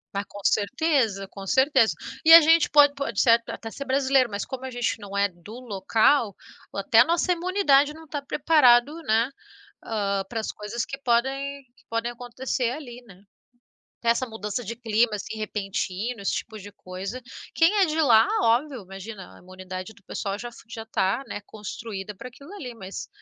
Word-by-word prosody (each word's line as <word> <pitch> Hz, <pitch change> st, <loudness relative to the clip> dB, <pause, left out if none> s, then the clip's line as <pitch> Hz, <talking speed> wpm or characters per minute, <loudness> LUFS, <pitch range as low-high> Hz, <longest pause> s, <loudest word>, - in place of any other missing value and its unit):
Ah, 200 Hz, -, -1 dB
com 205 Hz, -, -11 dB
certeza, 225 Hz, -4 st, +1 dB
com 195 Hz, 0 st, -10 dB
certeza, 265 Hz, -2 st, +3 dB, 0.3 s
e 325 Hz, -, +5 dB
a -, -, +12 dB
gente 325 Hz, 0 st, +4 dB
pode 290 Hz, -1 st, +6 dB
pode 275 Hz, -7 st, -3 dB
ser 230 Hz, -1 st, +5 dB
até 225 Hz, -, -7 dB
ser 275 Hz, -, -6 dB
brasileiro, 265 Hz, -2 st, +2 dB
mas 200 Hz, -1 st, -4 dB
como 260 Hz, -1 st, -7 dB
a 260 Hz, -, -4 dB
gente 245 Hz, -2 st, -2 dB
não 200 Hz, -1 st, -7 dB
é 200 Hz, -, +3 dB
do 200 Hz, +6 st, -12 dB
local 220 Hz, +1 st, +1 dB, 0.4 s
ou -, -, -4 dB
até 225 Hz, +3 st, +4 dB
a -, -, +10 dB
nossa 345 Hz, +2 st, +1 dB
imunidade 335 Hz, -5 st, +2 dB
não 320 Hz, -, -12 dB
está 290 Hz, -1 st, -5 dB
preparado, 280 Hz, -3 st, +4 dB
né. 230 Hz, -1 st, +1 dB, 0.5 s
Ah, 200 Hz, -3 st, -1 dB
para 230 Hz, -, -3 dB
as 220 Hz, -, -3 dB
coisas 210 Hz, +3 st, -5 dB
que 275 Hz, 0 st, -7 dB
podem 275 Hz, +3 st, -1 dB
que -, -, -25 dB
podem 230 Hz, +1 st, -2 dB
acontecer 245 Hz, +1 st, -3 dB
ali, 250 Hz, -3 st, -8 dB
né. 195 Hz, -1 st, -16 dB, 0.8 s
Essa 235 Hz, +2 st, +2 dB
mudança 220 Hz, +1 st, -4 dB
de 230 Hz, +4 st, -5 dB
clima 230 Hz, -1 st, +1 dB
assim 215 Hz, +2 st, -6 dB
repentino, 210 Hz, +1 st, -3 dB
esse 195 Hz, -, -1 dB
tipo 220 Hz, -2 st, -5 dB
de 205 Hz, +1 st, -11 dB
coisa. 195 Hz, +5 st, -7 dB, 0.3 s
Quem 330 Hz, +5 st, +4 dB
é 380 Hz, -, +6 dB
de 315 Hz, 0 st, 0 dB
lá, 230 Hz, -6 st, +5 dB
óbvio, 240 Hz, +2 st, +1 dB
imagina 195 Hz, +1 st, -10 dB
a -, -, -16 dB
imunidade 185 Hz, +2 st, -8 dB
do 200 Hz, -, -23 dB
pessoal 200 Hz, +1 st, -4 dB
já 240 Hz, +1 st, -7 dB
fa 230 Hz, -, -15 dB
já 225 Hz, -1 st, -7 dB
está, 220 Hz, +2 st, -1 dB
né, -, -, -5 dB
construída 210 Hz, -1 st, -7 dB
para 185 Hz, -, -9 dB
aquilo 280 Hz, +7 st, -15 dB
ali, 250 Hz, -10 st, -7 dB
mas 195 Hz, -3 st, -8 dB
235 Hz, 185 wpm, -25 LUFS, 205-275 Hz, 0.8 s, a